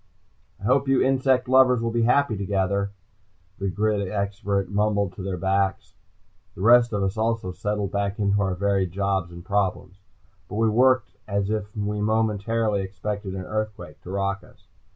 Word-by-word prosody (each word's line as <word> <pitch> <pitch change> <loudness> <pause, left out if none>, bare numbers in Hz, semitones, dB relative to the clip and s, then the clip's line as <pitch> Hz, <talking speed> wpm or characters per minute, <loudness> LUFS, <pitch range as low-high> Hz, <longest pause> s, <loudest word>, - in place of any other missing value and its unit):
"I - - -16
hope 130 +5 +2
you 135 -1 +3
insect 130 -1 +2
lovers 130 -1 +5
will 115 0 -1
be 120 0 0
very 115 +2 +4
happy 140 -6 +1
together," 100 0 0 0.7
the 100 0 -1
grid 105 0 0
expert 100 -1 -1
mumbled 100 -1 0
to - - -8
their 95 -1 -3
backs. 95 0 0 0.6
The - - -8
rest 120 +2 +6
of 100 -2 -1
us 95 +2 -2
also 110 -3 -1
settled 105 +1 -3
back 100 0 -1
into 100 0 +1
our 95 -2 0
varied 95 -1 0
jobs 95 -2 -1
and 85 0 -11
problems. 95 -1 -2 0.5
But 105 - -6
we 110 +1 +2
worked 125 -2 +3 0.2
as 100 0 -1
if 105 -1 -4
we 105 0 -2
momentarily 110 0 0
expected 95 +1 -5
an 95 -1 -5
earthquake 110 +1 -5
to - - -11
rock 100 0 -2
us. - - -21
100 Hz, 170 wpm, -24 LUFS, 95-110 Hz, 0.7 s, rest